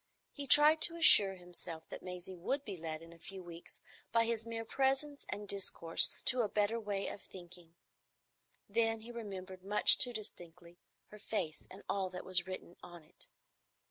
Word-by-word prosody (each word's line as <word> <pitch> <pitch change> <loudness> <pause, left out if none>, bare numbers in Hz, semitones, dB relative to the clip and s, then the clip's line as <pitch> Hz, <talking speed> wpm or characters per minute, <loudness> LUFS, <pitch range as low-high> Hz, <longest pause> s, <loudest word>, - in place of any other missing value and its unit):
He 285 -1 -9
tried 300 +3 +7
to 335 - +2
assure 205 -12 +7
himself 175 -2 -5
that - - -9
Maisie 180 +1 -9
would 270 +11 -4
be 200 - -7
led 160 -1 -7
in 165 0 -15
a 170 - -19
few 190 +2 -10
weeks 170 -1 -11 0.3
by 230 0 +2
his 230 -1 -3
mere 225 0 -6
presence 275 +3 -2
and 205 0 -6
discourse 185 -4 +3
to 250 -1 +3
a 215 - -2
better 210 +3 -1
way 205 -3 -4
of 200 - -8
thinking. 175 -2 -15 0.9
Then 225 +1 -1
he 235 +2 -11
remembered 190 -5 -9
much 205 +2 +5
too 250 - +4
distinctly 175 -6 -10 0.3
her 210 - -14
face 180 -7 -5
and 190 - -14
all 195 -2 -3
that 180 0 -9
was 180 -1 0
written 185 -2 -9
on 175 -2 -13
it. 165 - -12
195 Hz, 175 wpm, -33 LUFS, 175-230 Hz, 0.9 s, tried